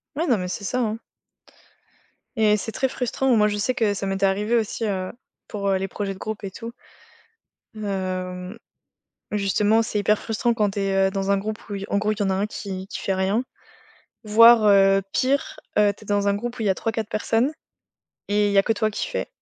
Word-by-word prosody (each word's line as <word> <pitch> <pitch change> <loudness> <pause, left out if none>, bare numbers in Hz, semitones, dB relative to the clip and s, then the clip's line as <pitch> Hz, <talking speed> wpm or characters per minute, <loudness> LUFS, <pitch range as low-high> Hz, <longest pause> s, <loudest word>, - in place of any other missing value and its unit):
Ouais, 325 +4 -1
non, 240 -7 +3
mais 180 -1 -3
c'est 185 - -5
ça, 250 +5 -1
hein. 225 -2 -1 1.4
Et 215 -1 +3
c'est 225 +3 -5
très 265 +3 0
frustrant. 250 0 0
Moi, 210 -1 +4
je 205 0 -1
sais 250 +5 0
que 215 -4 +1
ça 195 -1 -4
m'était 195 0 0
arrivé 205 +4 +1
aussi, 225 0 -1
heu, 190 -3 -2 0.4
pour, 200 -1 -4
heu, 190 - +2
les 195 +1 -2
projets 195 0 -4
de - - -15
groupe, 215 0 -5
et 195 - -3
tout. 230 +4 -8 1.0
Hem, 185 -2 -4 0.8
justement, 210 +2 +2
c'est 215 -1 -2
hyper 210 +1 +2
frustrant 235 +2 0
quand 210 -3 +1
tu 200 - -4
es, 195 -1 +2
heu, - - -3
dans 195 0 -1
un 200 - +3
groupe 215 +2 -3
où 205 - -3
il 195 - -5
y - - -4
en 200 - +1
gros, 210 +1 +1
il 210 - -10
y - - +2
en 195 - 0
a 190 - +1
1 195 +2 0
qui 190 -2 -6
qui - - -6
fait 195 - -1
rien. 190 +5 +1 0.8
Voire, 230 +1 +7
heu, 195 -1 +5
pire: 275 +2 0 0.2
heu, 205 -1 +5
tu - - -15
es - - -17
dans 205 0 +1
un 200 - +2
groupe 240 +4 -4
où - - -3
il - - -1
y - - +3
a 190 - +3
3-4 225 0 -3
personnes, 225 +5 0 0.8
et 205 0 +2
il - - -1
y 200 - +4
a - - +7
que 225 - +1
toi 215 0 0
qui 210 - -3
fais. - - -3
205 Hz, 235 wpm, -23 LUFS, 195-225 Hz, 1.4 s, Voire